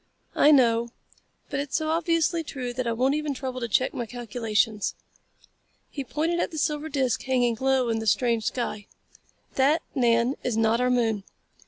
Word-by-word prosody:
"I 295 - +5
know, 235 -5 +4 0.6
but 280 - -1
it's 285 -1 -3
so 315 -1 -2
obviously 330 0 +1
true 255 -5 -5
that 255 0 -3
I - - +1
won't 255 +4 +1
even 300 -1 -2
trouble 255 -1 -4
to 235 - -3
check 255 +4 +1
my 240 -2 -4
calculations." 225 -2 -1 1.0
He 280 - -4
pointed 320 +6 -1
at - - 0
the 320 - -8
silver 300 +1 -1
disc 265 -4 0
hanging 245 -3 +1
low 265 -2 +2
in 225 -1 0
the 220 - -5
strange 230 0 +2
sky. 215 -4 -3 0.7
"That, 285 +5 +2
Nan, 240 0 +2
is 240 -3 -1
not 225 +1 +2
our 250 - +2
moon. 225 -5 +1
255 Hz, 175 wpm, -26 LUFS, 230-290 Hz, 1.0 s, I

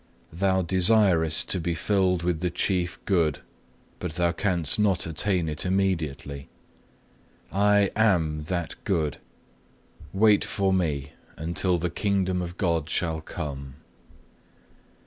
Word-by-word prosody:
Thou 95 +2 +1
desirest 90 -3 +3
to 95 - 0
be 85 0 -2
filled 90 -1 +1
with 85 -2 0
the 90 +1 -1
Chief 90 0 -1
Good, 85 -7 +1 0.6
but 90 -3 -4
thou 85 0 +1
canst 85 -2 +1
not 100 -4 +2
attain 85 +2 0
it 75 -1 -3
immediately. 80 -8 -2 1.0
I 100 0 +3
AM 80 -9 +1
that 85 0 -3
Good; 80 -8 -1 0.9
wait 105 +1 +4
for 95 -2 0
Me, 75 -7 -1 0.3
until 85 +2 0
the 85 +1 -2
Kingdom 95 -1 0
of 90 0 -6
God 85 -4 0
shall 80 -3 -1
come. 70 -5 -7
90 Hz, 120 wpm, -26 LUFS, 80-95 Hz, 1.0 s, wait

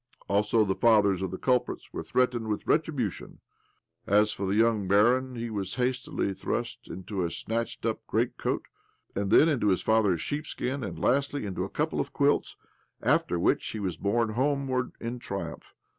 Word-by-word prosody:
Also, 105 +2 +3
the 95 - +1
fathers 100 -4 +4
of 95 - -1
the 95 - -5
culprits 125 +2 -1
were - - -3
threatened 125 -3 0
with 105 -1 -2
retribution. 145 - -1 0.7
As 105 +1 +4
for 100 - -3
the 95 - +1
young 110 -3 +2
Ъагіп, 125 +5 +3
he 115 0 -4
was 100 -3 -3
hastily 125 -5 -1
thrust - - -4
into 95 0 -4
a 85 - 0
snatched 115 +6 -3
up - - 0
greatcoat, - - -1 0.5
then 100 +10 +4
into 140 -9 +1
his 95 -2 +2
father's 105 -6 +3
sheepskin, 140 - -3
and, 95 -5 -5
lastly," 140 0 +1
into 95 -2 -3
a - - -7
couple - - -1
of - - -3
quilts; - - +1 0.5
after 90 - +2
which 85 - +2
he 110 - -5
was 95 -5 -2
borne 115 +3 +1
homeward 130 +1 0
in 120 +1 -4
triumph 100 -4 -6
110 Hz, 165 wpm, -28 LUFS, 100-125 Hz, 0.7 s, fathers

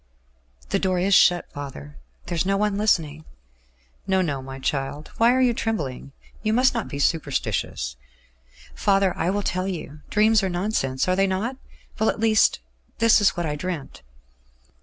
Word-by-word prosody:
"The - - +1
door 185 -1 0
is 190 +3 +1
shut, 175 -1 +5
father? 75 - -9 0.3
There 175 - -4
is 165 - +1
no 195 +1 +1
one 210 0 0
listening?" 160 -7 +1 0.8
"No, 190 -1 +2
no, 140 -5 -2
my 135 0 -8
child. 140 +2 -3
Why 230 +1 +6
are 260 +1 +2
you 250 -2 +3
trembling? 145 - -3 0.3
You 215 0 0
must 255 +3 +4
not 230 -3 -2
be 140 - -6
superstitious." 140 - -1 0.8
"Father, 195 -2 +2
I 175 - -1
will 205 +2 -1
tell 185 0 -1
you. 155 -5 -6
Dreams 215 +1 +4
are 190 - -1
nonsense, 175 -8 -1
are 185 - +2
they 195 +1 +2
not? 210 +8 -2 0.4
Well, 220 - +3
at - - -2
least, 220 - +3 0.4
this 230 -1 +5
is 200 - +3
what 175 - -1
I 150 -1 -2
dreamt. 165 -2 -5
185 Hz, 170 wpm, -24 LUFS, 145-210 Hz, 0.8 s, Why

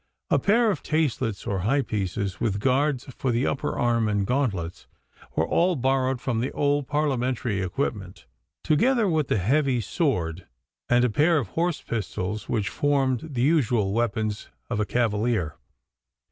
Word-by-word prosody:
A - - +4
pair 225 +2 +3
of 160 - -4
taslets 130 -9 -1
or 95 -2 -1
thigh 135 +8 +2
pieces, 100 -3 -3
with 105 -4 0
guards 135 +2 +1
for 130 - -1
the 120 +3 +1
upper 135 - -2
arm 115 -2 +2
and 100 -1 0
gauntlets, 100 -9 -2 0.5
were - - +1
all 175 +1 +2
borrowed 130 -1 +1
from 120 -2 -1
the 125 - -1
old 145 -1 +1
Parliamentary 130 -7 0
equipment, 95 -1 -3 0.4
together 230 - +3
with 155 -6 +1
the - - +1
heavy 130 +6 +2
straight 110 - -7
sword 90 - -1 0.4
and 120 -2 +3
pair 160 +5 +4
of 120 -10 -2
horse 170 - -1
pistols 105 -1 -4
which 105 -4 0
formed 140 0 0
the 120 - +1
usual 120 -10 +2
weapons 110 -2 -1 0.2
of 110 - 0
a 105 - 0
cavalier. 110 -6 0
125 Hz, 155 wpm, -25 LUFS, 105-145 Hz, 0.5 s, A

